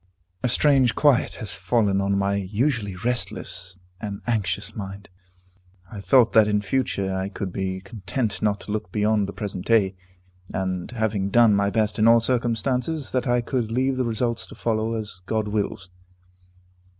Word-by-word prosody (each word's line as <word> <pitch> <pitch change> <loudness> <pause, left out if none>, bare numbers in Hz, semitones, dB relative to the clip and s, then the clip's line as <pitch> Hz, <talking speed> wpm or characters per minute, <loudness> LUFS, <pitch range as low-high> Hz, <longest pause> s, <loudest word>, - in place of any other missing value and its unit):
A 125 - +1
strange 135 -2 +4
quiet 145 -4 +3
has 110 -6 -4
fallen 100 +1 +1
on 100 0 +1
my 100 0 +1
usually 100 +2 -1
restless 95 -4 -3 0.2
and 100 -2 -5
anxious 105 -4 -1
mind. 100 -1 -7 0.8
I 105 -3 -7
thought 125 +2 +4
that 110 -2 +6
in 105 -1 +1
future 100 -5 -1
I 95 +1 -2
could 95 -2 -5
be 95 -1 -3
content 105 +3 -3
not 105 -1 +1
to - - -6
look 105 -4 -3
beyond 105 0 +1
the - - -5
present 100 -4 -5
duty, 100 -5 +3 0.6
and, 95 -2 -2
having 110 -4 -1
done 115 0 +5
my 100 0 +2
best 105 0 0
in 110 - +5
all 115 0 +7
circumstances, 125 +5 -1
that 130 0 0
I 120 0 +2
could 120 -2 -2
leave 130 +2 +1
the 130 - 0
results 115 0 -1
to - - -12
follow 110 0 -1
as 105 -5 -5
God 110 -1 0
wills. 100 -3 -3
110 Hz, 165 wpm, -24 LUFS, 100-120 Hz, 0.8 s, all